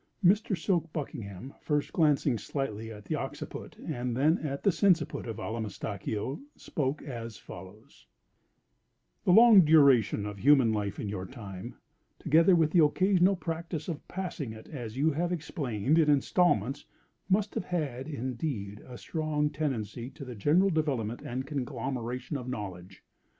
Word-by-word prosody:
Mr. 200 +1 +4
Silk 170 -2 0
Buckingham, 130 - -6
first 150 -1 -1
glancing 150 -5 +3
slightly 115 -6 -4
at 105 -2 -10
the - - -3
occiput - - -6
and 120 0 -3
then 155 +6 +3
at 140 -2 -4
the 200 - +5
sinciput 170 - +1
of 115 -2 -5
Allamistakeo, 110 - -4
spoke 140 -1 -3
as 115 -6 -6
follows: 95 +4 -13 1.2
"The - - +4
long 220 0 +9
duration 140 -10 +5
of 105 -1 -6
human 130 -2 +5
life 105 -2 -2
in - - -3
your 95 -2 -4
time, 100 -8 -8 0.4
together 165 +4 +4
with 160 -2 +3
the 170 -2 +6
occasional 185 +4 +3
practice 165 -2 -4
of 165 -5 -5
passing 175 -10 -4
it, 110 0 -12
as 120 -5 -7
you 155 +4 +3
have 170 +4 -1
explained, 150 - 0
in 155 -2 +4
installments, 145 - +2 0.4
must 200 +2 +2
have - - -3
had, 140 -7 -3
indeed, 120 -6 -4
a 125 -1 -9
strong 150 - -1
tendency 125 -5 -3
to 140 - -10
the 125 - -7
general 160 - +3
development 130 -8 -1
and 130 +2 -4
conglomeration 130 -1 -3
of 125 -1 -6
knowledge. 95 -5 -7
140 Hz, 145 wpm, -29 LUFS, 115-160 Hz, 1.2 s, long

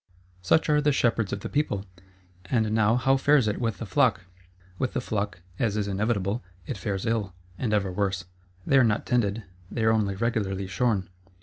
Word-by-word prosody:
Such 95 - +3
are 150 -1 +3
the 145 0 +3
shepherds 115 -6 +1
of 100 - -3
the - - -4
people: 105 -10 -1 0.6
and 110 +1 +1
now 110 +1 +3
how 135 +2 +3
fares 140 -3 +4
it 105 - -1
with 115 -5 -1
the - - -5
flock? - - +2 0.6
With 130 - -1
the - - 0
flock, 105 -5 -3 0.2
as 110 -3 +1
is 105 -1 -1
inevitable, 100 +2 -1 0.2
it - - -4
fares 100 0 -3
ill, 110 -5 -1 0.2
and 120 -4 -1
ever 100 -3 +1
worse. 95 -1 -1 0.4
They 135 - +5
are - - +6
not 110 -3 +1
tended, 115 -3 0 0.3
they 115 - -2
are 110 - +5
only 105 -3 +1
regularly 100 -3 -1
shorn. 95 0 0
110 Hz, 190 wpm, -26 LUFS, 100-120 Hz, 0.6 s, are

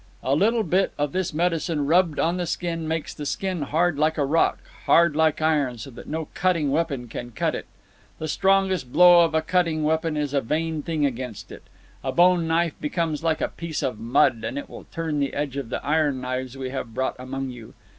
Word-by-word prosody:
A 130 - +1
little 220 +9 +3
bit 190 -1 +1
of 145 -1 -1
this 185 -1 -1
medicine 165 -2 0
rubbed 165 0 +3
on 170 +2 +1
the 175 -1 -2
skin 165 -2 -3
makes 160 -1 -3
the 150 - -7
skin 185 +4 -2
hard 155 +2 +1
like 155 +1 +2
a 145 - +2
rock, 160 +4 +2 0.3
hard 170 -3 +5
like 155 0 +2
iron, 145 -6 +1
so 115 +5 -8
that - - -11
no 160 +1 -3
cutting 170 -6 +1
weapon 140 -5 -1
can 120 +1 -6
cut 115 - -1
it. - - -5 0.5
The 155 - -4
strongest 190 -5 +1
blow 175 +2 +7
of 160 -1 0
a 160 - +2
cutting 165 -3 +1
weapon 160 0 0
is 145 -1 -2
a 140 - +2
vain 155 +5 -1
thing 155 -1 -1
against 125 -4 -4
it. - - -10 0.4
A 130 - -1
bone 175 +2 +4
knife 165 0 +1
becomes 160 0 -2
like 160 -1 +1
a - - +1
piece 165 -3 -5
of 130 -5 -2
mud; 115 0 +2
and - - -3
it 285 - -5
will - - -10
turn 165 -4 -3
the 140 -1 -1
edge 145 -2 -2
of 140 -5 -4
the - - -4
iron 150 -3 +1
knives 130 0 -4
we 130 -1 -4
have 125 -4 -5
brought 130 - -1
among 130 +1 -4
you. 120 -3 -12
155 Hz, 215 wpm, -24 LUFS, 135-170 Hz, 0.5 s, blow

